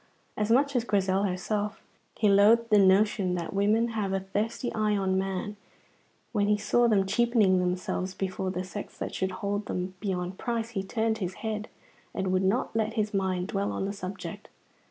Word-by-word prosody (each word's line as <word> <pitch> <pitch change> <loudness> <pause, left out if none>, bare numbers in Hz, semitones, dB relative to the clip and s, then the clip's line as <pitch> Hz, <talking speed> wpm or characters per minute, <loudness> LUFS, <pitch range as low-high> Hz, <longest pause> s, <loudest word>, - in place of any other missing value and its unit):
As 210 0 -1
much 275 +4 +3
as 245 - +2
Grizel 195 -3 +1
herself, 205 +3 -2 0.4
he 215 - +3
loathed 215 +3 +5
the 210 - +7
notion 195 -1 +3
that 170 -2 -4
women 215 +4 +2
have 210 -4 -2
a 195 - +1
thirsty 210 +5 -3
eye 215 -1 +1
on 190 -1 0
man; 195 +2 -2 0.7
when 205 -3 +1
he 210 0 +3
saw 240 +3 +2
them 200 -4 +3
cheapening 210 -2 +3
themselves 185 +1 -2
before 190 0 -2
the 185 0 -3
sex 200 +2 -8
that - - -4
should 190 - -1
hold 200 +2 -3
them 180 +1 -3
beyond 185 -2 -3
price, 230 -1 -2
he 210 -5 -2
turned 220 +2 -1
his 185 -2 -3
head 215 0 -3 0.5
and 190 -1 -1
would 185 0 +2
not 200 +6 0
let 220 0 0
his 215 -1 -1
mind 190 -1 -1
dwell 200 0 -1
on - - -2
the 200 - -3
subject. 195 -1 -7
200 Hz, 185 wpm, -28 LUFS, 190-220 Hz, 0.7 s, the